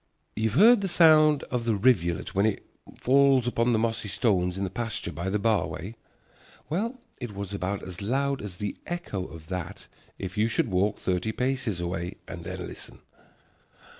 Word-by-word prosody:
You 110 +1 +1
have 110 - -3
heard 225 +1 +7
the 195 - -1
sound 155 -4 +6
of 125 -2 -1
the 115 -2 +2
rivulet 95 -6 +2
when 100 +3 +3
it 110 - -2 0.3
falls 135 -1 +4
upon 120 0 +1
the 115 - +3
mossy 110 -1 -1
stones 95 -3 +1
in 100 - -2
the 95 - -3
pasture 115 +2 -3
by 85 +5 -3
the 100 - +1
bar 110 0 +2
way? 95 +7 -6 0.8
Well, 230 +10 -1 0.2
it 120 -5 -6
was 100 0 -5
about 100 0 -2
as 90 0 -8
loud 135 +6 0
as 95 -4 -7
the 105 0 -3
echo 175 - -3
of 80 -2 -11
that 90 -3 -5 0.3
if 95 +2 -5
you 110 - +4
should 115 -1 0
walk 100 +3 +1
thirty 90 +3 -1
paces 125 -5 -1
away 85 +1 -3
and 85 -3 -7
then 90 0 -5
listen. - - -9
105 Hz, 185 wpm, -27 LUFS, 95-130 Hz, 0.8 s, heard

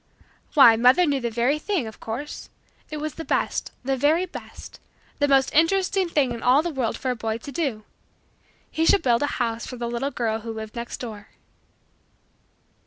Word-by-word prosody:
Why 235 -6 +8
mother 250 +9 +5
knew 285 -3 +1
the 235 - -1
very 245 +6 +1
thing 360 - -1
of 220 0 -9
course. 255 +7 -6 0.4
It 305 - -5
was 305 0 -4
the 325 - -7
best - - -1
the 270 +1 0
very 305 +7 +2
best 365 - -11 0.4
the 290 - +3
most 270 -1 +3
interesting 370 +3 +2
thing 285 -6 +1
in 235 -1 -5
all 260 +5 +4
the 345 - -2
world 255 -6 -2
for 260 - -2
a - - -2
boy 225 -1 -3
to 280 +5 -9
do. 265 -8 -2 0.9
He 320 - 0
should 390 +4 +4
build 240 -2 +3
a 290 - +1
house 230 -2 -2
for 250 - -7
the 240 - -4
little 240 +4 -2
girl 225 -5 -2
who 225 +1 -6
lived 220 -1 -7
next 235 0 -5
door. 215 -4 -8
260 Hz, 190 wpm, -24 LUFS, 235-305 Hz, 0.9 s, Why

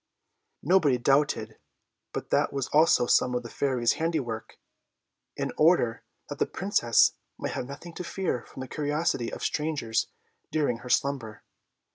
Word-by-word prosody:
Nobody 165 -8 +4
doubted 120 -4 +1 0.5
but - - -6
that - - +2
was 140 -2 -3
also 155 -4 +4
some 125 +1 +3
of 125 - -1
the 115 - -9
Fairy's 125 -4 +1
handiwork, 135 -9 -2 0.8
in - - -2
order 155 -8 +3 0.3
that - - -7
the - - +2
Princess 180 - +3 0.3
might - - -3
have 125 - -4
nothing 155 +5 -9
to 180 - -6
fear 175 -8 -2
from 130 - -9
the 130 - -5
curiosity 150 -4 -1
of - - -7
strangers 145 -8 -1 0.4
during 145 -7 0
her 125 +1 -10
slumber. 130 -6 -1
135 Hz, 145 wpm, -27 LUFS, 120-155 Hz, 0.8 s, Nobody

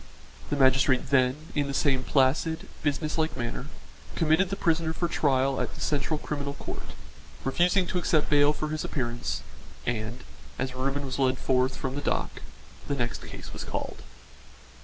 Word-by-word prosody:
The - - +1
magistrate 130 -1 +4
then, 130 -2 +4 0.2
in 145 -2 +1
the 140 - -3
same 135 -2 +3
placid, 140 +5 +2
business 150 +2 0
like 160 0 0
manner, 120 +3 -3 0.5
committed 165 +3 +3
the 195 - -1
prisoner 165 -3 +1
for 175 +1 0
trial 135 -4 +2
at - - -3
the - - -11
Central 150 +1 0
Criminal 140 -1 -4
Court, - - -7 0.5
refusing 175 +7 +3
to 180 - -1
accept 155 -3 +2
bail 145 0 +5
for 155 0 -3
his 155 0 -2
appearance, 120 -3 -2 0.4
and, 120 +1 -2 0.3
as 130 -1 -2
Reuben 135 +2 -1
was 135 +1 -4
led 130 -1 +3
forth 130 0 +2
from 130 -1 -3
the 145 - -3
dock, - - -1 0.5
the 140 - 0
next 120 -3 -2
case - - -9
was - - -5
called. - - -4
140 Hz, 165 wpm, -28 LUFS, 130-155 Hz, 0.5 s, bail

